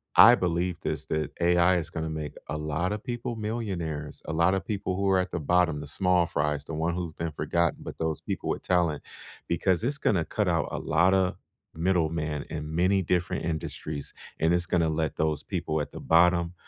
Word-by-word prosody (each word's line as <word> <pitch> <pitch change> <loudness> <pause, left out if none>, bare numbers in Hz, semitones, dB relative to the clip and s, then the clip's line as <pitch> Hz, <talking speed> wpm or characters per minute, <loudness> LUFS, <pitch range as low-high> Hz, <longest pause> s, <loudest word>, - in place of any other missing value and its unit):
I - - +10
believe 90 0 -1
this, 80 -4 -3
that 80 0 -1
AI 90 +1 +4
is 85 -2 -3
gonna 80 -1 -4
make 75 -2 -4
a 75 - -3
lotta 80 +7 -1
people 120 0 -4
millionaires, 95 -9 -4
a 80 - -4
lotta 90 +4 +3
people 95 -3 -3
who 100 +1 +1
are 95 -1 +4
at 90 - -2
the - - -2
bottom, 85 -1 +2
the 75 - -8
small 90 +2 +2
fries, 75 -3 -1
the 80 - -7
one 80 +2 0
who've 85 -3 -4
been 85 0 -2
forgotten, 85 +3 0
but - - -8
those 80 -1 -2
people - - -4
with - - -1
talent 85 -5 +1 0.5
because 90 +3 +1
it's 140 +5 0
gonna 95 - +2
cut 105 +5 -1
out 85 -4 +1
a - - -3
lotta 90 +3 +2 0.4
middlemen 80 -3 0
in 75 0 -5
many 95 +3 +3
different 90 -1 0
industries, 80 -2 -4 0.3
and 80 +2 +3
it's 90 0 +1
gonna 85 -2 +2
let 80 0 -1
those 75 -2 0
people 80 -4 -2
at 75 - -5
the - - -8
bottom 85 +1 +3
85 Hz, 195 wpm, -27 LUFS, 80-90 Hz, 0.5 s, I